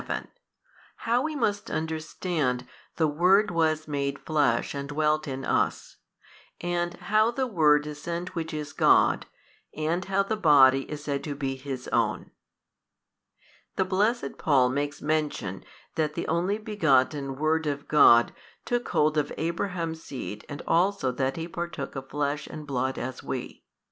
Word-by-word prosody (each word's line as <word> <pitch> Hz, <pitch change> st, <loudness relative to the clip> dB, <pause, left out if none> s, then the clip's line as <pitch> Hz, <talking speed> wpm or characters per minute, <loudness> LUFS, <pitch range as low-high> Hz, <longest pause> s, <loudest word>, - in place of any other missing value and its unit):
How 235 Hz, +2 st, 0 dB
we 310 Hz, +1 st, -2 dB
must 210 Hz, -6 st, -1 dB
understand 155 Hz, -4 st, -2 dB, 0.3 s
The 160 Hz, -, +2 dB
Word 180 Hz, +7 st, +3 dB
was 155 Hz, -2 st, +1 dB
made 140 Hz, -1 st, -2 dB
Flesh 145 Hz, -7 st, +1 dB
and 140 Hz, -1 st, -5 dB
dwelt 155 Hz, +1 st, +1 dB
in 135 Hz, -1 st, -4 dB
us, -, -, -1 dB, 0.6 s
and 175 Hz, 0 st, -2 dB
how 215 Hz, +4 st, +2 dB
the 260 Hz, +2 st, -1 dB
Word 150 Hz, -9 st, +3 dB
is 150 Hz, -1 st, -7 dB
sent 170 Hz, +2 st, -4 dB
which 165 Hz, -2 st, -4 dB
is 150 Hz, -2 st, -5 dB
God, -, -, +4 dB, 0.5 s
and 160 Hz, +4 st, 0 dB
how 195 Hz, +1 st, +1 dB
the 220 Hz, +2 st, -2 dB
Body 135 Hz, -7 st, +5 dB
is 150 Hz, -1 st, -6 dB
said 140 Hz, -2 st, -2 dB
to 145 Hz, -2 st, -4 dB
be 135 Hz, -2 st, -2 dB
His 130 Hz, -1 st, -6 dB
own. -, -, 0 dB, 1.4 s
The 190 Hz, -, +1 dB
blessed 200 Hz, -, 0 dB
Paul 135 Hz, -5 st, +3 dB
makes 145 Hz, +2 st, -3 dB
mention 150 Hz, -11 st, -1 dB, 0.3 s
that 155 Hz, -2 st, -1 dB
the -, -, -3 dB
Only 175 Hz, +5 st, 0 dB
Begotten 145 Hz, -, +1 dB
Word 155 Hz, +2 st, +1 dB
of 145 Hz, 0 st, -3 dB
God 120 Hz, -6 st, +6 dB, 0.3 s
took 245 Hz, 0 st, -1 dB
hold 155 Hz, 0 st, +2 dB
of 145 Hz, -, -2 dB
Abraham's 165 Hz, -1 st, -2 dB
seed 120 Hz, -8 st, -7 dB
and 145 Hz, -, -6 dB
also 175 Hz, -6 st, +2 dB
that 130 Hz, +1 st, -1 dB
He 165 Hz, 0 st, -4 dB
partook 170 Hz, -5 st, -5 dB
of 135 Hz, 0 st, -6 dB
flesh 145 Hz, +1 st, -2 dB
and 155 Hz, -1 st, -8 dB
blood 130 Hz, -1 st, -1 dB
as 130 Hz, 0 st, -5 dB
we. -, -, -6 dB
155 Hz, 150 wpm, -27 LUFS, 140-175 Hz, 1.4 s, God